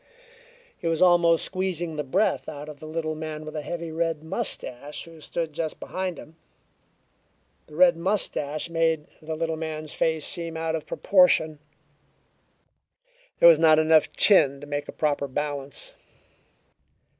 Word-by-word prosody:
He - - -4
was 165 -1 0
almost 170 -2 +4
squeezing 180 -4 -2
the 150 - -2
breath 185 +10 0
out 145 0 -8
of 150 -2 -10
the 155 - -9
little 155 0 -3
man 155 0 -6
with 155 +1 -8
a 155 - -2
heavy 170 +1 -5
red 165 -1 -2
mustache 145 -3 -3
who 165 -1 -14
stood 165 0 -4
just 160 0 -4
behind 185 -3 -4
him. 160 +2 -13 1.3
The 150 - -14
red 175 0 +5
mustache 165 -5 -1
made 165 -2 0 0.2
the 160 0 -5
little 160 0 -2
man's 155 -1 -5
face 160 -2 0
seem 165 -2 -4
out 160 0 -1
of 160 - -6
proportion; 160 -5 +3 1.8
there - - +8
was 165 -2 +7
not 160 -1 +6
enough 155 0 +4
of - - -26
chin 140 -9 +5
to 145 - -10
make 145 0 -4
a - - -6
proper 145 -2 -1
balance. 140 -1 -4
160 Hz, 155 wpm, -25 LUFS, 150-170 Hz, 1.8 s, there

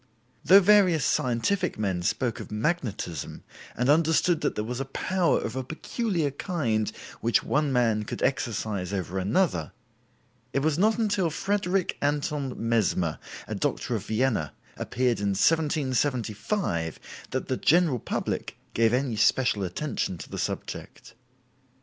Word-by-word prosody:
Though 195 +2 +8
various 185 -5 +5
scientific 175 - 0
men 95 -4 -1
spoke 110 +6 -1
of - - -8
magnetism, 105 - -3 0.3
and 125 - +1
understood 160 +2 +3
that - - 0
there 105 - -1
was 125 +3 -4
a 135 - -2
power 180 +6 +1
of 110 - -4
a 130 - -2
peculiar 160 - -2
kind 120 - -1 0.3
which 115 +1 +2
one 150 -1 +1
man 115 -4 +2
could - - -5
exercise 105 -7 -1
over 95 -1 -2
another, 95 - 0 0.8
it 135 - +1
was 155 +1 +1
not 215 +3 +3
until 205 -6 +1
Frederick 190 +2 -1
Anton 145 -2 -1
Mesmer 110 -8 0 0.3
(a - - -4
doctor - - -1
of - - -3
Vienna) 110 - 0 0.2
appeared 125 -1 0
in 100 -1 0
1775 130 - 0 0.3
that 130 - -3
the 130 - 0
general 165 -5 +3
public - - -3 0.2
gave 115 0 +3
any 125 -2 0
special 120 +1 +2
attention 95 - -2
to - - -10
the - - -4
subject. - - -5
130 Hz, 135 wpm, -27 LUFS, 110-160 Hz, 0.8 s, Though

